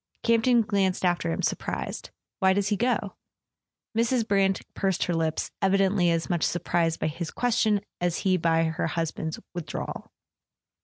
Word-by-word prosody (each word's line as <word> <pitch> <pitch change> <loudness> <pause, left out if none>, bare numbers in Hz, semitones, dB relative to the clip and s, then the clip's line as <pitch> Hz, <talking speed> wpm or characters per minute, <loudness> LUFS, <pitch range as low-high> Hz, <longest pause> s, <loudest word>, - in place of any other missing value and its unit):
Campton 230 +1 +4
glanced 195 -3 0
after 175 -2 +1
him, - - -2
surprised. - - -3 0.3
"Why 190 -1 +4
does 200 0 0
he 210 - +2
go?" 220 -3 -1 0.8
Mrs. 230 0 +1
Brant 195 -2 +2
pursed 190 -2 0
her 175 - -1
lips, 160 -1 -1
evidently 195 -2 +3
as 165 -1 0
much 175 -2 0
sur¬ 175 - 0
prised 165 -1 +1
by - - -1
his 165 +2 -3
question 220 -4 +1 0.2
as 175 -1 0
he 185 -1 +4
by 165 -1 +2
her 160 0 -1
husband's 160 -1 -3 0.2
with¬ 175 - -3
drawal. - - -5
190 Hz, 160 wpm, -26 LUFS, 165-205 Hz, 0.8 s, Campton